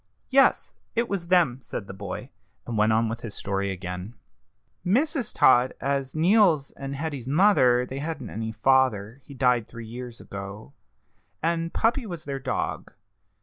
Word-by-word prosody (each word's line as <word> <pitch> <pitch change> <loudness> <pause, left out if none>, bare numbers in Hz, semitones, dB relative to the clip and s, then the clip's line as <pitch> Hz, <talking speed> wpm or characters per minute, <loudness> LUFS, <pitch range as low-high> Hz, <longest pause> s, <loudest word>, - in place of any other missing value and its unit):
"Yes, 270 +1 +4 0.2
it 235 +1 +1
was 190 -5 -3
them," 170 -9 +3
said 105 - -6
the 95 - -8
boy, 100 +1 -7 0.3
and 120 - -4
went 110 +1 +3
on 110 +1 +3
with 115 +1 -4
his 110 -4 -5
story 100 0 -2
again: 90 +3 -6 0.7
"Mrs. 255 - +1
Todd 125 0 +4
was 135 0 -2
Neal's 170 -4 +4
and 140 0 -6
Hetty's 140 -4 -4
mother 135 -7 +4
they 135 +2 -6
hadn't 145 -6 -5
any 110 +1 -4
father; 115 -1 +2
he 140 - -12
died 125 -3 +2
three 115 -1 -9
years 120 +1 -8
ago 100 +6 -8 0.7
and 165 0 0
Puppy 235 +1 +1
was 170 -5 -7
their 140 -1 -4
dog. 130 0 -3
130 Hz, 155 wpm, -26 LUFS, 110-165 Hz, 0.7 s, Yes